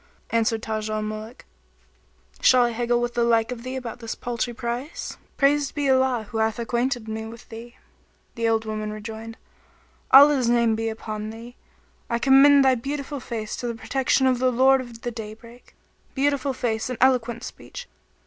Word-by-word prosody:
Answered 225 0 +1
Taj 215 -1 -3
al 215 0 -2
Muluk, 215 +2 -7 1.0
"Shall 250 -1 +6
I 240 - +2
haggle 240 +1 0
with 240 0 -2
the 240 - +1
like 230 0 +2
of 240 -2 -6
thee 255 +2 -6
about 245 -2 -6
this 230 -2 -5
paltry 240 0 -3
price? 240 +5 -5 0.2
Praised 285 +1 +2
be 290 -2 -1
Allah 260 -3 +2
who 225 - -2
hath 220 0 +1
acquainted 240 0 -1
me 220 0 -5
with 230 +1 -12
thee!" 235 +2 -10 0.6
The 230 0 0
old 225 0 +1
woman 215 -1 -4
rejoined, 220 +1 -8 0.7
"Allah's 275 -3 +7
name 235 -2 +3
be 225 0 -2
upon 215 -1 -5
thee! 230 +2 -10 0.5
I 235 - +1
commend 275 +2 +6
thy 265 - +5
beautiful 280 +3 -4
face 225 -3 -5
to 245 - -4
the 235 - -3
protection 265 +3 +1
of 255 -2 +2
the 255 0 +2
Lord 265 +2 +4
of 235 -2 -11
the 240 - -3
Daybreak.[FN#29] 230 +2 -13
Beautiful 280 -1 0
face 240 -2 -2
and 250 - -4
eloquent 245 -2 +2
speech! - - -9
235 Hz, 175 wpm, -24 LUFS, 225-260 Hz, 1.0 s, Allah's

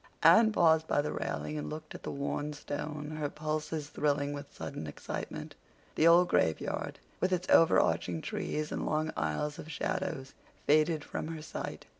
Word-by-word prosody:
Anne 225 -1 +7
paused 160 -5 +4
by - - +2
the 145 - 0
railing 150 0 -3
and - - -4
looked 155 +1 -7
at - - -8
the - - -5
worn 145 +1 -2
stone, 150 +1 -5
her 145 -1 -1
pulses 155 0 -3
thrilling 145 -1 0
with 145 0 -7
sudden 80 - -6
excitement. 75 - -6 0.4
The 160 - +4
old 175 +2 +7
graveyard, 80 - 0 0.2
with 185 - +1
its 180 0 0
over 165 - +7
arching 85 -2 +1
trees 155 0 -3
and - - -2
long 155 +1 0
aisles 80 - -1
of 160 - -7
shadows, 165 -5 -3 0.3
faded 155 +1 +3
from - - -4
her 160 -1 -6
sight. - - -6
155 Hz, 170 wpm, -31 LUFS, 145-160 Hz, 0.4 s, Anne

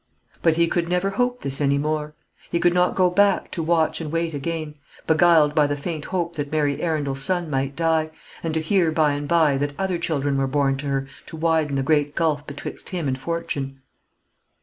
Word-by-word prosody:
But 165 -2 +3
he 170 0 +3
could 170 0 -1
never 180 +2 +1
hope 245 +4 -1
this 135 +1 +1
any 140 0 +2
more; 150 +1 -2 0.3
he 170 - 0
could 175 0 +3
not 180 0 +2
go 180 -1 +3
back 200 +1 +2
to 170 - -3
watch 165 0 +1
and 155 -2 -5
wait 165 0 -1
again, 155 +1 -4 0.3
beguiled 160 -2 +4
by 150 -1 +3
the 145 0 -2
faint 155 +1 -5
hope 170 -2 -3
that 145 -1 -3
Mary 145 -2 0
Arundel's 145 -5 -1
son 175 +1 0
might 135 0 -1
die, 160 0 +1 0.3
and 165 - -2
to 160 - +1
hear 170 0 +2
by 155 -2 +2
and 145 0 -4
by 160 -4 +3
that 145 +1 -3
other 190 -3 -1
children 145 -4 -1
were 135 - +1
born 135 0 +1
to 145 +2 -5
her 135 -1 -1 0.2
to 160 - -9
widen 160 -3 +1
the 135 - 0
great 145 0 +1
gulf 155 -3 0
betwixt 145 0 -7
him 175 -6 -3
and 130 0 -2
fortune. 140 -4 -4
155 Hz, 210 wpm, -23 LUFS, 145-170 Hz, 0.3 s, beguiled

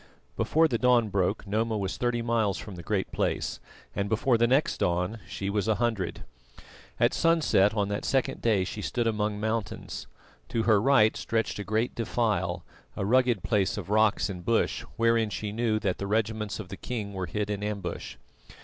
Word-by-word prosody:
Before 160 +1 +3
the 115 -6 -1
dawn 125 -3 +4
broke 100 +2 0
Noma 110 +2 0
was 95 -2 -2
thirty 120 -1 0
miles 115 -4 +1
from 105 - -8
the 90 - -8
Great 100 +1 -2
Place, - - -1 0.4
and 100 +1 -1
before 115 +3 +2
the 120 +1 +3
next 135 +5 +2
dawn 90 +6 0
she 100 - -4
was 100 +1 0
a 110 - +3
hundred. 110 -7 -1 0.8
At - - +3
sunset 155 - +3
on 100 -2 +1
that 100 - -2
second 135 -2 0
day 105 -5 +2
she 105 +3 -5
stood 120 +3 -1
among 105 -2 0
mountains. 110 0 -3 0.4
To 115 - 0
her 110 -3 +4
right 120 -4 +4
stretched 115 -2 -1
a - - -3
great 110 +4 0
defile, 100 -7 -1 0.3
a 95 - -2
rugged 120 -3 +3
place 105 +1 +1
of 100 -1 -5
rocks 110 0 +3
and 90 -3 -6
bush, 115 +3 +1
wherein 115 -1 +2
she 105 0 -4
knew 110 0 0
that 95 -4 -1
the 100 - -3
regiments 110 -1 -1
of 100 -4 -7
the 95 - -7
king 110 -5 -4
were 95 -2 -3
hid 105 +4 -2
in 100 -1 -3
ambush. 100 -5 -4
110 Hz, 185 wpm, -28 LUFS, 100-115 Hz, 0.8 s, dawn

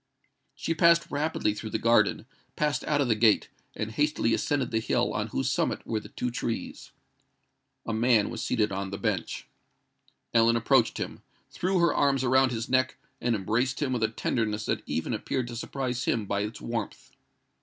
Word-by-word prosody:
She 165 - -2
passed 170 +1 +4
rapidly 145 -7 0
through 110 +1 -6
the - - -1
garden, 115 -2 +3 0.3
passed 150 -1 0
out 145 -1 +1
of 135 - +1
the 115 - +4
gate, 110 -1 +3 0.3
and 110 0 -3
hastily 145 -3 +1
ascended 135 -4 0
the 110 - +1
hill 110 - 0
on - - -1
whose 65 - -1
summit - - -1
were 110 - -1
the - - -12
two 125 - -3
trees. 120 -1 -4 1.0
A 115 - -2
man 115 -1 +3
was 115 -2 -5
seated 105 -2 +1
on 95 0 -3
the 100 - -5
bench. 100 -4 -2 0.9
Ellen 115 0 +5
approached 115 +1 +3
him, - - -5 0.3
threw 185 +1 0
her 170 -3 +3
arms 135 -2 +2
round 130 +1 +4
his 115 -1 -3
neck, 130 0 +1 0.2
and 120 -1 +1
embraced 115 +6 0
him 140 -3 0
with 120 - -1
a 110 - +3
tenderness 110 -1 -2
that - - -1
even - - -2
appeared 125 -2 -2
to 120 - -6
surprise 125 +1 -3
him 110 -3 0
by 100 0 -1
its 105 +2 -4
warmth. 115 -3 -5
115 Hz, 185 wpm, -28 LUFS, 110-130 Hz, 1.0 s, Ellen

